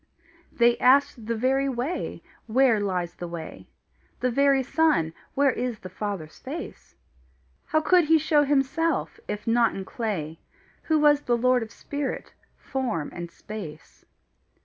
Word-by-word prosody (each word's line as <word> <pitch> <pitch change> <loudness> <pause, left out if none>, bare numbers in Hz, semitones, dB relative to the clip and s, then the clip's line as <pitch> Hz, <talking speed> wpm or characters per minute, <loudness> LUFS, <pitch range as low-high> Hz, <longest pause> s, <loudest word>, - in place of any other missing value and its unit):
They 235 0 +3
asked 255 -3 +3
the 230 - 0
very 265 +4 +1
Way, 265 +7 -3 0.2
where 240 -1 +4
lies 180 -4 -2
the 175 - -7
way; 170 -2 -8 0.5
The 250 0 +1
very 275 +1 +3
Son, 295 - +2 0.2
where 280 -1 +4
is 245 -1 -3
the 185 - -10
Father's 185 -5 -5
face; - - -8 0.7
How 310 0 +1
he - - -9
could 325 -3 +5
show 305 0 +3
himself, 290 +7 0
if 210 0 -4
not 230 0 +3
in 195 - -5
clay, 185 -8 -4 0.5
Who 315 - +3
was 295 -1 +5
the 240 -4 +1
lord 250 +1 +3
of 225 - -5
spirit, 285 -1 -5 0.2
form, 240 - -3
and 175 -1 -6
space. 170 -5 -9
245 Hz, 145 wpm, -26 LUFS, 205-280 Hz, 0.7 s, could